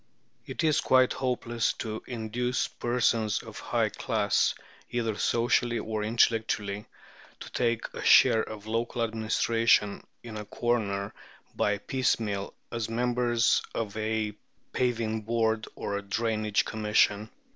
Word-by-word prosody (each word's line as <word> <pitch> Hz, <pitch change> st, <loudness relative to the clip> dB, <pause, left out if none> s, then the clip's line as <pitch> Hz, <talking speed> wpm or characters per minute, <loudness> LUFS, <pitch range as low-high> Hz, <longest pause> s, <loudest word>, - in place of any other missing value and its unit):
It -, -, -3 dB
is 155 Hz, -2 st, +3 dB
quite 130 Hz, -1 st, +4 dB
hopeless 120 Hz, -2 st, -1 dB
to 110 Hz, -1 st, -5 dB
induce 120 Hz, +1 st, -1 dB
persons 115 Hz, -3 st, 0 dB
of -, -, -9 dB
a -, -, -11 dB
high -, -, +1 dB
class, -, -, +1 dB, 0.3 s
either 115 Hz, -2 st, -1 dB
socially 120 Hz, +2 st, +1 dB
or 110 Hz, -2 st, -3 dB
intellectually, 110 Hz, -2 st, +1 dB, 0.5 s
to -, -, -9 dB
take 115 Hz, -2 st, 0 dB
a -, -, -6 dB
share 110 Hz, -, +6 dB
of 110 Hz, -2 st, -7 dB
local 115 Hz, +2 st, -1 dB
administration 110 Hz, -1 st, +2 dB, 0.2 s
in 115 Hz, -2 st, -7 dB
a 105 Hz, -, -6 dB
corner 105 Hz, -3 st, -1 dB, 0.4 s
by 105 Hz, 0 st, +1 dB
piecemeal 105 Hz, -4 st, -1 dB, 0.2 s
as 115 Hz, -2 st, -3 dB
members 120 Hz, 0 st, +2 dB
of 110 Hz, -3 st, -3 dB
a 110 Hz, -1 st, -1 dB, 0.4 s
Paving 115 Hz, -3 st, 0 dB
Board 110 Hz, 0 st, 0 dB
or 100 Hz, -, -3 dB
a -, -, -4 dB
Drainage 110 Hz, +1 st, 0 dB
Commission." 105 Hz, -1 st, +1 dB
115 Hz, 125 wpm, -28 LUFS, 110-120 Hz, 0.5 s, share